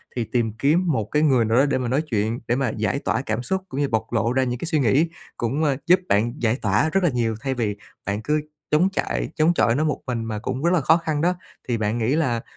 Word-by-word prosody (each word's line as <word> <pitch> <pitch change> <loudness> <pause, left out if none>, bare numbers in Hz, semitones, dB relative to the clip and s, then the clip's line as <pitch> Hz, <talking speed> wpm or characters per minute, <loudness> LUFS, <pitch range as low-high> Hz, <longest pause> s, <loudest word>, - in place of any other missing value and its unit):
thì 120 - 0
tìm 115 -2 -1
kiếm 150 +10 +2
một 110 -8 0
cái 150 - +2
người 130 -6 +4
nào 110 +2 +2
đó 135 - +5
để 140 - +1
mà 125 -2 -2
nói 135 +5 +1
chuyện, 115 -5 -1
để 120 - +2
mà 135 -2 0
giải 110 +5 0
tỏa 130 - -1
cảm 110 -3 -2
xúc 190 +7 -1
cũng 135 - -4
như 145 - +2
bộc 110 0 -2
lộ 115 +1 +1
ra 130 0 +2
những 125 -1 -2
cái - - -4
suy 160 -3 +1
nghĩ 140 +7 +3 0.3
cũng, 130 +7 -1
à, 145 -3 +2
giúp 180 +1 +6
bạn 110 +4 +2
giải 115 0 +2
tỏa 105 +9 +2
rất 195 +4 +1
là 175 - +4
nhiều 120 -4 -1
thay 135 -1 -1
vì 110 -5 -2 0.3
bạn 100 +1 -2
cứ 150 +6 0 0.3
chống 165 +5 +4
chạy - - -2
chống 160 +3 +3
chọi 115 -8 +2
nó 150 - +1
một 155 -1 -1
mình 115 -3 -2
mà 110 -2 -3
cũng 130 +5 -4
rất 170 - +3
là 170 - +3
khó 160 +4 +5
khăn 155 -3 -2
đó. 180 +2 +2 0.3
Thì 120 - 0
bạn 110 +1 -1
nghĩ 120 +4 +1
là 125 -8 0
125 Hz, 275 wpm, -23 LUFS, 115-150 Hz, 0.3 s, giúp